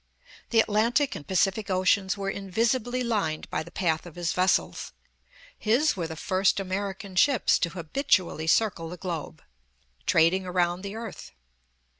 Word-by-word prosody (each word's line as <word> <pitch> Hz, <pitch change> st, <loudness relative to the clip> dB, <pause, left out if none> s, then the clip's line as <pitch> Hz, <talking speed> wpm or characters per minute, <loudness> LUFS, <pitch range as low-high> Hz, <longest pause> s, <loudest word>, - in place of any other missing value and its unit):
The 230 Hz, -, +3 dB
Atlantic 235 Hz, +7 st, +1 dB
and 145 Hz, -, -9 dB
Pacific 195 Hz, +3 st, +1 dB
Oceans 190 Hz, +1 st, +2 dB
were 195 Hz, 0 st, -2 dB
invisibly 235 Hz, +6 st, -1 dB
lined 200 Hz, -10 st, -1 dB
by -, -, -1 dB
the 165 Hz, -, -9 dB
path 170 Hz, -2 st, -1 dB
of 170 Hz, -, -12 dB
his 175 Hz, -2 st, -1 dB
vessels. 185 Hz, +1 st, 0 dB, 0.6 s
His 250 Hz, +8 st, +2 dB
were 170 Hz, -4 st, -3 dB
the 160 Hz, -, -7 dB
first 190 Hz, +5 st, +1 dB
American 195 Hz, 0 st, -4 dB
ships 260 Hz, +4 st, +3 dB
to 170 Hz, -, 0 dB
habitually 175 Hz, -, 0 dB
circle 170 Hz, -3 st, +1 dB
the 180 Hz, -, -7 dB
globe, 170 Hz, -4 st, -6 dB, 0.6 s
trading 170 Hz, +4 st, +4 dB
around 180 Hz, -1 st, 0 dB
the 200 Hz, +1 st, -6 dB
earth. 225 Hz, -, -8 dB
190 Hz, 145 wpm, -27 LUFS, 175-215 Hz, 0.6 s, trading